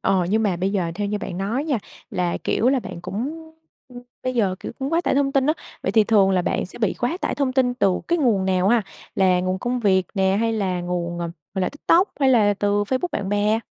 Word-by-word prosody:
Ờ, 185 -2 +1
nhưng 220 +1 +2
mà 195 -5 +1
bây 190 +3 -1
giờ 180 -5 0
theo 205 +2 -2
như 210 0 -1
bạn 180 -3 -5
nói 225 +9 -1
nha, 280 -7 0 0.3
là 175 -1 -1
kiểu 240 - +2
là 265 -2 +2
bạn 170 - -8
cũng 220 - -4 0.8
bây 255 0 -2
giờ, 200 -6 +1
kiểu, - - -6
cũng 275 +3 -3
quá 335 - +3
tải 345 - 0
thông 275 0 +1
tin 270 0 +2
á, 305 - +4 0.3
vậy - - -1
thì 220 -2 +5
thường 205 -3 +4
là 185 -1 +2
bạn - - -1
sẽ 185 - -11
bị 215 -4 +1
quá 245 +8 -1
tải - - -1
thông 275 -3 0
tin 250 -2 +2
từ 195 -7 +1
cái 345 0 +2
nguồn 225 -9 +2
nào 190 0 +2
ha? 235 -1 +4 0.3
Là 185 -2 +3
nguồn 185 +1 -1
công 245 +3 -2
việc 190 -4 +2
nè, 190 -1 +2
hay 230 0 +1
là 190 -4 -1
nguồn, 175 -1 -3
ờ, 170 -1 -3 0.2
gọi 190 - -1
là, - - +1
TikTok 340 +6 +2
hay 270 - +4
là 215 -5 +4
từ 205 +1 +1
Facebook 260 - -1
bạn 195 -2 -2
bè? 205 +2 +2
205 Hz, 255 wpm, -22 LUFS, 185-255 Hz, 0.8 s, thì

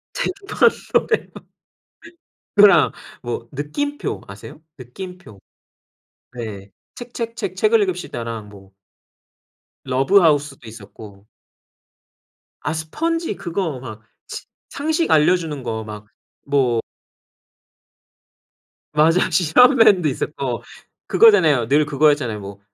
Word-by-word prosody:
쟁반 400 -1 +1 0.2
노래방 445 - +1 1.3
그거랑 200 -5 +6 0.3
뭐 120 -1 -5
느낌표 285 - -4
아세요? 100 +9 -11 0.2
느낌표. 130 - -11 0.9
네. 105 -5 -8 0.3
책책책 230 -5 -6
책을 215 +2 +3
읽읍시다랑 115 - -4
뭐 100 -2 -16 1.2
러브하우스도 145 - +2
있었고. 105 -2 -13 1.3
아 155 - -2
스펀지 330 - -3
그거 170 -6 -4
막 115 -4 -9 0.3
식 - - -8 0.2
상식 315 +3 -1
알려주는 155 -2 +2
거 110 -2 -4
막 105 -1 -9 0.4
뭐 130 -5 +1 2.1
맞아. 165 +5 +3
실험맨도 195 - +4
있었고, 130 -3 -3 0.4
그거잖아요. 160 - +5
늘 150 +4 +3
그거였잖아요. 145 -6 +1
뭐, 100 0 -10
150 Hz, 205 characters per minute, -20 LUFS, 120-195 Hz, 2.1 s, 그거랑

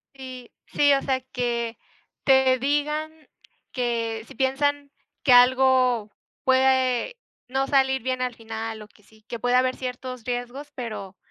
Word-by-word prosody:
Sí. 255 -2 -9 0.2
Sí, 285 -1 +3
o 275 - +2
sea 260 -1 0
que, 235 -2 -2 0.5
te 265 -1 +5
digan 295 +3 -1 0.6
que, 230 -3 -2
si - - -12
piensan 285 +2 0 0.3
que 260 - +3
algo 250 -3 +4 0.3
puede 260 - +2 0.3
no 270 +1 0
salir 265 -2 +2
bien 255 +1 -2
al 250 -1 -1
final 225 -1 -6
o 210 - -11
que 210 - -26
sí 220 +1 -23
que 235 - -6
puede 245 +2 +1
haber 255 0 +2
ciertos 255 -1 -6
riesgos, 245 +4 -5
pero 215 -6 -7
255 Hz, 145 wpm, -24 LUFS, 235-265 Hz, 0.6 s, te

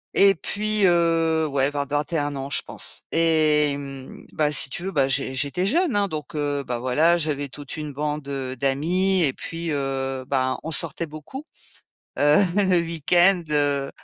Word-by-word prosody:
et 195 0 +5
puis, 210 +4 -1
heu, 165 -2 +2
ouais 140 -1 0
vers 145 -1 -3
21 145 0 -2
ans, 135 +1 -5
je - - +2
pense. - - -3
Et 155 -3 +3
hem, 140 -2 -8
bah 150 -1 +1
si 140 - +3
tu 175 - -6
veux, 190 - -3
bah 140 -6 +2
j'é 135 -1 -1
j'étais 145 +7 -1
jeune 320 - +1
hein, 205 -1 +2
donc, 155 -1 -6
heu, 145 -1 -1
bah, 125 - -2
voilà, 150 +8 +3
j'avais 150 -3 -2
toute 145 +2 -10
une 150 -2 -5
bande, 150 0 -3
heu, 135 -2 -4
d'amis 175 +8 +1
et 140 - +3
puis, 165 0 -6
heu, 135 -2 -2
bah, 130 -1 0
on 160 - -6
sortait 165 +2 0
beaucoup, 155 - -9 0.7
heu, 145 +1 +5 0.2
le 190 -3 +3
week-end, 175 +3 +3
heu 145 -2 +1
150 Hz, 175 wpm, -23 LUFS, 140-170 Hz, 0.7 s, et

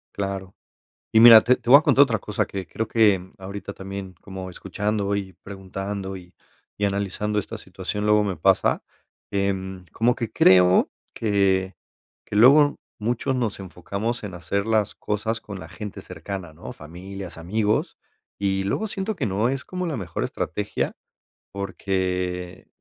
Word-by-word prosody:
Claro. 95 -1 -4 0.6
Y 110 - +6
mira, 115 -1 +11
te 125 +3 +3
te 120 -2 -11
voy 140 - +11
a - - -11
contar 140 -3 +6
otra 115 -6 -1
cosa 105 0 -1
que 95 -1 -5
creo 110 - -3
que 100 -5 +2
ahorita 100 +1 -7
también 95 -1 -7
como 95 -1 -7
escuchando 100 +2 -2
y 95 -2 -4
preguntando 95 0 -5
y 90 0 -13 0.4
y 105 - 0
analizando 100 +1 -1
esta 110 +2 -4
situación, 100 +2 -4
luego 105 0 +4
me 95 -4 -2
pasa, 80 - +2 0.5
em, 95 -2 -2
como 120 +2 +2
que 115 -3 -4
creo 90 0 +5 0.2
que 95 -3 +1 0.5
que 105 - -5
luego 145 +6 +7 0.2
muchos 120 +4 -1
nos 120 -5 -1
enfocamos 100 +5 -4
en 100 -3 -6
hacer 100 +4 -2
las 110 -2 +1
cosas 110 +2 -2
con 100 -4 -8
la - - -9
gente 105 -3 -7
cercana, 90 0 -7
¿no?, 85 - -9
familias, 90 +4 -9
amigos, 105 +5 -1 0.4
y 95 -1 0
luego 155 - -1
siento 205 0 -3
que 140 - -1
no 105 +4 +1
es 135 0 -2
como 180 -1 -4
la 155 - -2
mejor 90 -7 -4
estrategia 105 0 -2 0.6
porque, 90 -2 -3
100 Hz, 155 wpm, -24 LUFS, 95-110 Hz, 0.6 s, mira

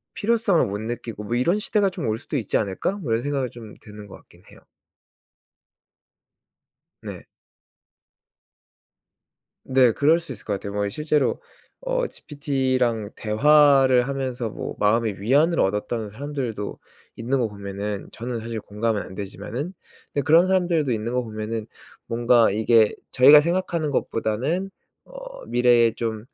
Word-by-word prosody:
필요성을 220 -5 +2
못 100 0 -4
느끼고 115 -2 -6
뭐 115 +3 -3
이런 170 +12 +1
시대가 205 -2 +1
좀 175 -9 -4
올 110 - 0
수도 145 - -7
있지 110 - 0
않을까?' 100 - -2
뭐 170 - -5
이런 115 +1 +1
생각이 135 -3 -2
좀 115 -3 -11
드는 105 -1 -12
거 - - -11
같기는 - - -20
해요. - - -16 2.4
네. - - -8 2.4
네 130 -3 +4
그럴 155 +7 +3
수 165 -6 -7
있을 105 - -12
것 105 - -2
같아요. 100 +1 -6
뭐 105 0 -1
이 - - -3
실제로 150 +3 0 0.4
어 - - -1
GPT랑 130 - -2
대화를 135 +2 +4
하면서 130 -4 -3
뭐 - - -6
마음의 105 -1 +1
위안을 145 +10 +3
얻었던 105 +2 -1
사람들도 125 -4 -5 0.4
있는 125 +4 -1
거 115 - 0
보면은 100 0 -6
저는 120 0 -5
사실 115 -1 -5
공감은 105 +1 -2
안 95 - -11
되지만은 105 - -6 0.4
네 145 - +1
그런 165 +6 +5
사람들도 175 -7 +1
있는 115 +2 -3
거 125 0 0
보면은 110 0 -5 0.4
뭔가 120 0 +3
이게 110 +1 +3 0.2
'저희가 140 +4 +8
생각하는 170 -1 -1
것보다는 140 - -1 0.3
어 - - -11
미래에 120 -2 +4
좀 115 -1 -4
120 Hz, 295 characters per minute, -23 LUFS, 110-150 Hz, 2.4 s, 저희가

